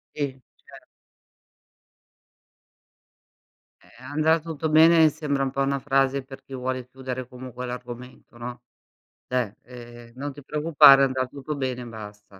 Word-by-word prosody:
Sì, 145 -1 0 0.4
cer - - -15 3.0
Eh, 125 - -19
"andrà 155 +4 +2
tutto 160 -1 -4
bene" 160 +2 +6
mi 160 -1 +7
sembra 145 -2 -2
un 135 - -1
po' 140 - -2
una 140 0 +1
frase 135 0 +1
per 135 0 -12
chi 135 - -13
vuole 130 -1 -3
chiudere 130 -1 -6
comunque 125 0 -8
l'argomento, 125 0 -9
no. 120 0 -7 0.7
Cioè, 125 -4 -1
ehm, 120 -1 -12
"Non 140 +2 -5
ti 145 0 -12
preoccupare, 150 -2 +6
andrà 130 -1 +1
tutto 140 +3 -6
bene," 130 -3 -3
e - - -7
basta. 105 -3 -11
130 Hz, 140 wpm, -25 LUFS, 125-145 Hz, 3.0 s, mi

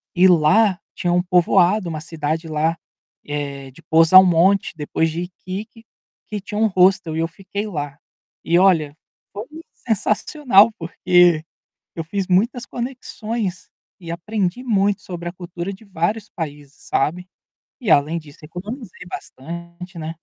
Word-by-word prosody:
e 185 +2 +6
lá 185 +4 +4 0.2
tinha 175 -1 0
um 180 - +3
povoado, 180 +2 +3
uma 155 -2 -4
cidade 160 0 -3
lá, 160 +2 0 0.5
eh, 140 -2 -5
de 165 - -17
Posal 165 +4 +7
Monte 185 +3 +3
depois 160 +2 -1
de 170 +2 -3
Iquique, 195 +5 -8 0.4
que 210 -2 -5
tinha 210 0 -6
um 220 - +4
hostel 185 -4 +3
e - - -1
eu 165 - +1
fiquei 200 +4 -6
lá. 145 -6 -5 0.5
E 170 +1 +3
olha, 160 -6 +3 0.3
foi 210 +3 -6 0.4
sensacional, 220 +1 +3
porque 175 -1 +3 0.5
eu 165 - -3
fiz 195 +3 -3
muitas 235 +7 +2
conexões, 230 -5 -5 0.3
e 165 -1 -8
aprendi 195 +5 -2
muito 205 -3 +1
sobre 175 -1 -6
a - - -6
cultura 175 +1 -6
de 195 +3 -13
vários 200 +3 -2
países, 145 -4 -7 0.2
sabe. 180 +6 0 0.5
E 205 -9 0
além 150 +4 +4
disso 155 -1 -11
economizei 185 - -8
bastante, 170 +4 -8
né. 160 +1 -5
180 Hz, 140 wpm, -21 LUFS, 165-200 Hz, 0.5 s, Posal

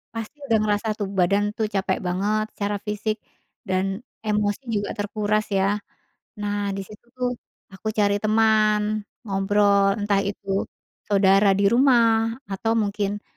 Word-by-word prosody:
pasti 225 +6 -6
udah 225 -3 +4
ngerasa 210 +1 0
tuh 205 -2 -3
badan 200 +1 +2
tuh 220 -1 0
capek 195 -2 -1
banget 205 +4 0
secara 205 0 -2
fisik 215 +1 -2 0.5
dan 195 +2 0 0.2
emosi 210 +3 0
juga 205 -2 -1
terkuras, 210 +1 -1
ya. 195 0 +2 0.8
Nah, 205 0 -1 0.2
di 195 - -3
situ 210 +4 -14
tuh 250 -1 0 0.4
aku 195 +3 -6
cari 205 -1 +2
teman, 215 0 +3 0.4
ngobrol, 200 -1 +2
entah 205 -1 +2
itu 195 -1 -2 0.4
saudara 195 0 +4
di 200 - +1
rumah 230 -3 +4 0.2
atau 210 +4 -1
mungkin 205 -1 -1
205 Hz, 135 wpm, -23 LUFS, 195-215 Hz, 0.8 s, udah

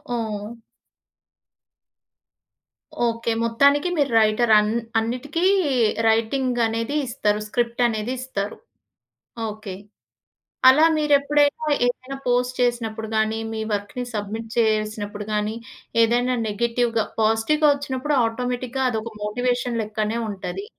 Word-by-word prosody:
ఓహ్! 220 -1 -4 2.5
Okay. 230 0 -1
మొత్తానికి 280 +8 +3
మీరు 280 -3 +1
writer 220 +2 +2
అన్ 210 +1 0 0.3
అన్నిటికి 255 +9 -3 0.6
రైటింగనేది 230 +1 0
ఇస్తారు. 210 -4 0
స్క్రిప్ట్ 235 +2 -1
అనేది 225 +2 -2
ఇస్తారు. 210 -6 -4 0.9
ఓకే. 210 -3 -7 0.9
అలా 285 +5 +7
మీరెప్పుడైనా 295 0 +2 0.2
ఏదైనా 255 +2 -3
పోస్ట్ 250 0 +1
చేసినప్పుడు 225 -2 -1
గాని, 220 0 +1
మీ 220 - -4
వర్క్‌ని 205 +5 -3
సబ్మిట్ 215 +2 -4
చేసినప్పుడు 215 -2 0
గాని, 210 +1 -1 0.5
ఏదైనా 245 +2 +2
నెగెటివ్‌గా, 230 +1 0 0.2
పాజిటివ్‌గా 225 +8 +3
వచ్చినప్పుడు 280 +1 -2
ఆటోమేటిక్‌గా 250 +2 -2
అదొక 225 -1 -3
మోటివేషన్ 245 +2 -1
లెక్కనే 215 +1 -2
ఉంటది. 205 - -5
230 Hz, 95 wpm, -23 LUFS, 215-255 Hz, 2.5 s, అలా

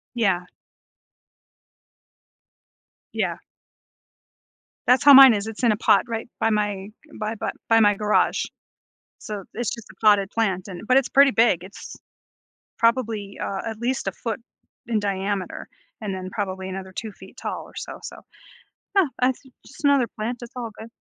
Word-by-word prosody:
Yeah. 195 -6 +1 2.7
Yeah. - - -1 1.5
That's 250 +1 +4
how 285 -1 +10
mine 265 -3 +10
is, 205 +1 -2
it's 225 +1 -7
in 235 -3 +4
a - - -1
pot - - +4
right 225 0 -4
by 225 - +2
my 205 -2 -1 0.3
by 215 +1 -2 0.3
by 225 0 +5
my 205 -1 +5
garage, 210 +1 +1 0.8
so 210 -3 -6
it's 240 -2 -2
just 230 -2 -8
a - - -13
potted 205 -2 +5
plant, 195 -4 -1
and, 180 -2 -8
but 255 - +4
it's 270 - 0
pretty 275 0 +6
big 225 -8 +3
it's 195 - -10 0.8
probably, 225 -4 0
uh, 195 -1 -3
at 220 -1 -5
least 245 -2 -2
a - - +1
foot 230 +1 -4 0.5
in 225 -3 +1
diameter, 195 -1 -3 0.3
and 205 -3 -3
then 185 0 -5
probably 190 -4 -4
another 190 0 -7
2 220 +3 -5
feet - - -15
tall - - -4
or - - -16
so, - - -7
so, - - -8 0.8
yeah, 390 - +5 0.2
that's 255 0 +2 0.2
just - - -14
another 280 -4 +4
plant, 230 +3 -3
it's 240 - -10
all 240 -3 -5
good. 220 - -9
215 Hz, 155 wpm, -23 LUFS, 200-235 Hz, 2.7 s, how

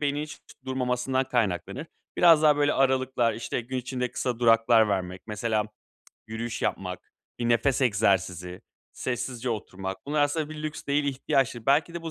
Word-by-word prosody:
beynin 145 0 0
hiç 155 0 -8 0.3
durmamasından 130 0 0
kaynaklanır. 105 - -1 0.3
Biraz 165 -3 +6
daha 150 -2 +5
böyle 145 0 +2
aralıklar, 130 -3 +2
işte 115 - -3
gün 125 +2 -5
içinde 125 0 -3
kısa 125 -3 -2
duraklar 115 -1 +5
vermek, 95 -2 -2
mesela 110 0 -1 0.6
yürüyüş 110 +1 -5
yapmak, 90 -1 -3 0.3
bir 120 -1 -1
nefes 125 +3 +2
egzersizi, 95 -6 +1 0.3
sessizce 125 0 -3
oturmak, 95 -1 -5
bunlar 150 0 +1
aslında 150 +1 0
bir 155 0 -7
lüks 155 0 -5
değil, 145 +1 +1
ihtiyaçtır. 130 -3 0
Belki 145 +5 +3
de 170 - -5
bu 165 - -5
125 Hz, 155 wpm, -27 LUFS, 110-140 Hz, 0.6 s, Biraz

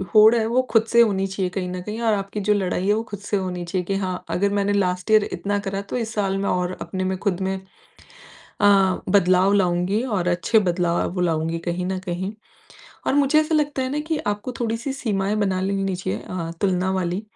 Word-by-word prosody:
होड़ 215 +2 +8
है 225 -1 +1
वो 250 +3 +2
खुद 225 -1 +4
से 235 +1 +5
होनी 195 -4 +2
चाहिए 190 -1 -2
कहीं 180 -1 -3
न 180 0 -4
कहीं 215 +4 -5
और 225 -2 +2
आपकी 200 +1 -3
जो 210 +1 +2
लड़ाई 190 -1 -1
है, 205 - +4
वो 220 - -1
खुद 205 -4 -8
से 205 0 -2
होनी 180 -2 -3
चाहिए 180 +1 -2
कि 195 - -1
हाँ, 185 -2 -3
अगर 200 +2 +1
मैंने 205 0 +1
लास्ट 180 +1 0
ईयर 215 -1 +6
इतना 205 0 -1
करा, 195 0 -3
तो 200 - -5
इस 225 -2 -3
साल 195 -2 0
में 200 - -1
और 180 0 -1
अपने 185 -1 -3
में 185 0 -1
खुद 195 -2 -1
में 190 0 -1 1.1
अ, 195 -2 +4
बदलाव 185 0 +4
लाऊँगी 185 +2 +1
और 205 -9 -1
अच्छे 180 +6 +3
बदलाव 175 -3 0
वो 180 - -2
लाऊँगी। 165 -1 0
कहीं 175 +1 -3
न 190 0 -2
कहीं 185 +2 -4 0.8
और - - +2
मुझे 285 +2 +4
ऐसा 310 +1 0
लगता 290 -3 +1
है 260 - -2
ना 295 - -1
कि 320 -2 0
आपको 205 +4 -2
थोड़ी 230 -1 0
सी 265 +4 -4
सीमाएँ 210 -5 -1
बना 190 -3 0
लेनी 195 0 -1
चाहिए 105 - -3
अ, 170 -3 -5
तुलना 190 -1 +1
वाली 185 +1 -1
195 Hz, 225 wpm, -23 LUFS, 185-215 Hz, 1.1 s, होड़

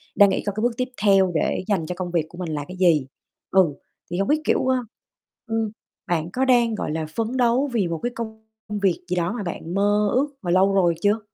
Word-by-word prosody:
đang 200 -1 +7
nghĩ 190 - -1
coi 205 - -1
cái 215 - -2
bước 240 +2 +2
tiếp 255 0 -1
theo 195 -3 +5
để 155 - 0
dành 195 -7 0
cho 180 - -4
công 180 -1 -4
việc 170 -3 +1
của 175 - -13
mình 180 -2 -4
là 145 -1 -4
cái 185 - -9
gì? 165 -7 +3 0.4
Ừ, 180 -7 +4 0.4
thì 175 - -2
hông 195 - +1
biết, 305 +1 +2
kiểu, - - +2
ơ, 260 0 +3 0.7
ưm, 225 -1 -1 0.4
bạn 170 -3 -1
có 260 +6 0
đang, 240 -3 +3
gọi 180 - -3
là, 160 0 -2
phấn 225 -1 0
đấu 250 +3 +2
vì 205 -6 +1
một 165 -1 -3
cái 240 - -1
công 220 -2 -6 0.4
việc 185 -3 +2
gì 180 - -1
đó 175 0 0
mà 220 -1 -4
bạn 170 -1 -5
mơ 205 +1 +2
ước 270 +4 +2
mà 175 -4 -2
lâu 190 +2 +4
rồi 175 -4 +3
chưa? 205 +2 +3
195 Hz, 245 wpm, -23 LUFS, 175-225 Hz, 0.7 s, đang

